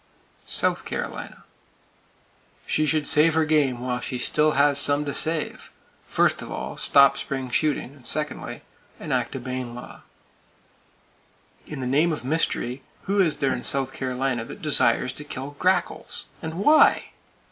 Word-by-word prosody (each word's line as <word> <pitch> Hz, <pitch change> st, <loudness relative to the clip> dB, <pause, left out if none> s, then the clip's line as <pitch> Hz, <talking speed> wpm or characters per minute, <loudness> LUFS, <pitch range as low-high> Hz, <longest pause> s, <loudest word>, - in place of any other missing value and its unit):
South -, -, +1 dB
Carolina: -, -, -6 dB, 1.2 s
She 155 Hz, 0 st, 0 dB
should 155 Hz, -1 st, +1 dB
save 155 Hz, +3 st, +4 dB
her 160 Hz, -1 st, +3 dB
game 145 Hz, -6 st, +1 dB
while 125 Hz, 0 st, -2 dB
she 125 Hz, 0 st, -4 dB
still 150 Hz, +5 st, +3 dB
has 140 Hz, 0 st, +3 dB
some 145 Hz, +1 st, +2 dB
to 140 Hz, -, -3 dB
save. 160 Hz, -1 st, -2 dB, 0.4 s
First -, -, +1 dB
of -, -, -8 dB
all, -, -, -5 dB
stop 140 Hz, -1 st, +4 dB
spring 130 Hz, -2 st, -4 dB
shooting; 145 Hz, -2 st, -1 dB
secondly, 150 Hz, +4 st, -3 dB, 0.4 s
enact -, -, -2 dB
a -, -, -3 dB
Bayne 125 Hz, -1 st, -5 dB
law. 120 Hz, -, -10 dB, 1.7 s
In 150 Hz, -3 st, -6 dB
the -, -, -3 dB
name 150 Hz, +7 st, +2 dB
of 150 Hz, -5 st, -5 dB
mystery, 135 Hz, -3 st, -1 dB, 0.2 s
who 200 Hz, +1 st, 0 dB
is 170 Hz, -6 st, +3 dB
there 135 Hz, -2 st, +1 dB
in 120 Hz, -, -4 dB
South 135 Hz, 0 st, 0 dB
Carolina 130 Hz, -2 st, -2 dB
who -, -, -9 dB
desires 140 Hz, -4 st, +1 dB
to 150 Hz, -, -7 dB
kill 140 Hz, -1 st, -7 dB
grackles? 185 Hz, +1 st, 0 dB
And 160 Hz, -2 st, -5 dB
why? 300 Hz, -, +4 dB
140 Hz, 145 wpm, -24 LUFS, 130-155 Hz, 1.7 s, save